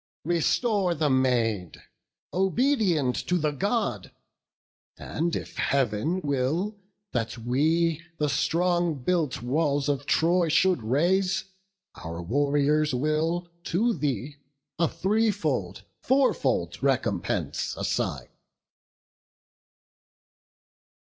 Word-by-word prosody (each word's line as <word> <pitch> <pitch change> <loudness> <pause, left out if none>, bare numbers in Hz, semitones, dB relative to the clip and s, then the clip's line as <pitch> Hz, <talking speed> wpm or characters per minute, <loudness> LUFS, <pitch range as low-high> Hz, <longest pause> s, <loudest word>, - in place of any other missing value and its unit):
Restore 180 - +1
the 150 -2 +1
maid, 115 -8 +1 0.5
obedient 190 - +2
to 180 - +2
the 155 -3 0
God! 195 - -1 0.9
And 165 +2 -2
if - - -6
Heav'n 140 - 0
will 150 +8 -1 0.4
that 115 -1 -2
we 155 +7 +1 0.2
the 150 - +1
strong 175 +3 +1
built 155 -7 0
walls 140 +2 +1
Of 140 0 -1
Troy 170 +4 +3
should 175 -1 +3
raze, 180 - +1 0.5
our 85 +1 -7
warriors 145 - +1
will 160 +5 0
to 230 +7 +1
thee 140 - -3 0.4
A 170 - +3
threefold, 205 +3 0 0.2
fourfold 265 0 +1
recompense - - -1
assign." - - -2
155 Hz, 90 wpm, -26 LUFS, 135-180 Hz, 0.9 s, Troy